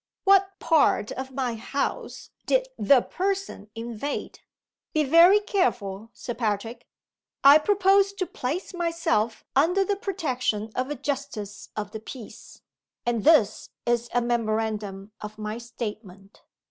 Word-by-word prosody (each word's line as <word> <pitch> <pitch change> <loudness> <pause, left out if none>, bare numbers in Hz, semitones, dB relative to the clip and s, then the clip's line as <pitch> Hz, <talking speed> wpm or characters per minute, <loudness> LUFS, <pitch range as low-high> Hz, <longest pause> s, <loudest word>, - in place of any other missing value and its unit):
"What 390 0 +4
part 315 -9 +2
of 265 0 -5
my 260 -2 -2
house 250 +5 -4 0.2
did - - +2
'The 275 -3 +5
Person' 385 - -3
invade? 235 +4 -5 0.6
Be 310 - +3
very 335 +8 +7
careful, 225 - -1
Sir 240 - -6
Patrick! 225 +1 -3 0.6
I 280 +2 +9
propose 395 +2 +3
to 395 -2 -2
place 320 +6 -4
myself 330 -10 0
under 355 +8 +3
the 405 - 0
protection 255 - -2
of 255 +2 -2
a 295 - -2
justice 270 -7 -5
of 210 -1 -4
the 220 - -6
peace; 225 +1 -11 0.4
and 235 -2 0
this 275 -10 +4 0.2
is 240 0 0
a 245 0 +1
memorandum 215 -4 -2
of 210 0 -8
my 215 +1 -4
statement. 210 -5 -8
250 Hz, 130 wpm, -25 LUFS, 215-335 Hz, 0.6 s, I